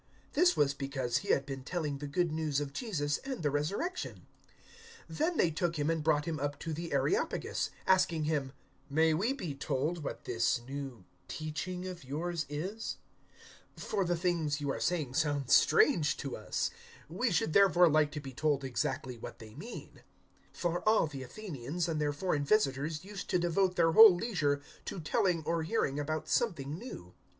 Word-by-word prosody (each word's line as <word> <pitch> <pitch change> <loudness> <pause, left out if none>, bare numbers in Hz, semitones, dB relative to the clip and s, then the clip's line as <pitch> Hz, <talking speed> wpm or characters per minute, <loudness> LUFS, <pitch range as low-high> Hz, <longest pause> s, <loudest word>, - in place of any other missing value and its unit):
This 355 +3 +4
was 140 -1 +3
because 135 -3 -2
he - - -5
had 135 - +2
been 135 -2 -6
telling 150 -2 -3
the 145 - -5
Good 170 +3 0
News 155 -3 0
of 145 -1 -4
Jesus 145 - -1
and 265 -9 -5
the 145 - +2
Resurrection. 200 - -2 0.9
017:019 - - -7
Then 325 +2 +1
they 165 - +3
took 170 +1 -1
him 150 +2 +1
and 160 -2 -1
brought 150 -1 +2
him 160 -3 -3
up 145 0 -2
to 165 - -3
the 165 +2 -5
Areopagus, 425 +5 0 0.2
asking 185 -4 +3
him, 150 -3 -1 0.4
"May 160 +2 +3
we 200 +11 +1
be 180 - -4
told 145 +4 -2
what - - -5
this 120 0 +1
new 135 -3 -6 0.2
teaching 160 +4 -4
of 180 -4 -7
yours 160 +3 -3
is? 190 +10 -4 0.8
017:020 - - -9
For 200 -2 +2
the 175 -1 0
things 165 -4 0
you 140 -1 -1
are - - -3
saying 155 -8 -1
sound 145 -3 0
strange 160 - +5
to 140 - -4
us. - - -2 0.4
We 195 +11 0
should 160 -4 +1
therefore 180 -3 +6
like 155 -1 +3
to 150 - -3
be 135 -2 -8
told 150 -2 +1
exactly 130 -1 -2
what - - -8
they 110 -1 -12
mean." 200 - -9 0.5
017:021 - - -20
(For 175 +3 0
all 220 - +4
the 145 -3 -7
Athenians 160 - -4
and 160 -2 -1
their 145 -1 +1
foreign 145 -1 -1
visitors 155 -2 +1
used 200 -1 -7
to - - +3
devote 180 +2 +1
their 165 -2 +4
whole 220 0 +10
leisure 155 -9 0 0.2
to - - -5
telling 165 +1 +1
or 165 +2 0
hearing 155 -5 0
about 155 +1 -2
something 155 - 0
new.) 90 - -9
155 Hz, 185 wpm, -32 LUFS, 145-180 Hz, 0.9 s, whole